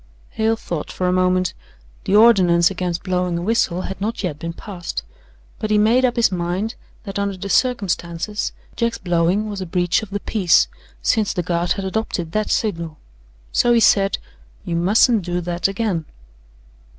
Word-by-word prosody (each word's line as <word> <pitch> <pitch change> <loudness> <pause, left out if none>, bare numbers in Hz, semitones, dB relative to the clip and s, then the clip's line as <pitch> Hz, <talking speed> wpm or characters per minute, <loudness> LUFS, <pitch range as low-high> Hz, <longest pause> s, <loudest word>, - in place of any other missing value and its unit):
Hale 220 +1 +1
thought 170 -8 -5
for 180 - -2
a - - +2
moment. 185 -1 +2 0.5
The 195 - +2
ordinance 185 -6 +5
against 180 -2 -3
blowing 180 -2 0
a - - -3
whistle 190 -4 +1
had 195 - -6
not 220 +2 -2
yet 155 -5 -3
been 165 +1 -4
passed, 175 0 -6 0.6
but 215 - -3
he 215 - +3
made 225 +5 +4
up 245 - 0
his 235 -4 +3
mind 180 +5 -2 0.3
that, 200 -1 -5
under 200 -1 -2
the 200 +2 -6
circumstances, 200 -5 0 0.2
Jack's 235 -1 0
blowing 175 +3 +1
was 205 -2 -5
a 185 - -4
breach 175 0 +1
of 215 - -8
the 205 +1 -3
peace, 190 -4 +3 0.4
since 220 -3 +2
the 180 - -2
Guard 170 0 0
had 195 - -5
adopted 190 -5 -2
that 215 +3 -1
signal. 165 -7 -1 0.5
So 240 - +3
he 235 - +5
said: 195 -3 +4 0.5
"You 170 - -2
mustn't 210 +6 +4
do 175 0 -2
that 175 +1 -1
again." 195 -5 -2
190 Hz, 175 wpm, -20 LUFS, 175-215 Hz, 0.6 s, ordinance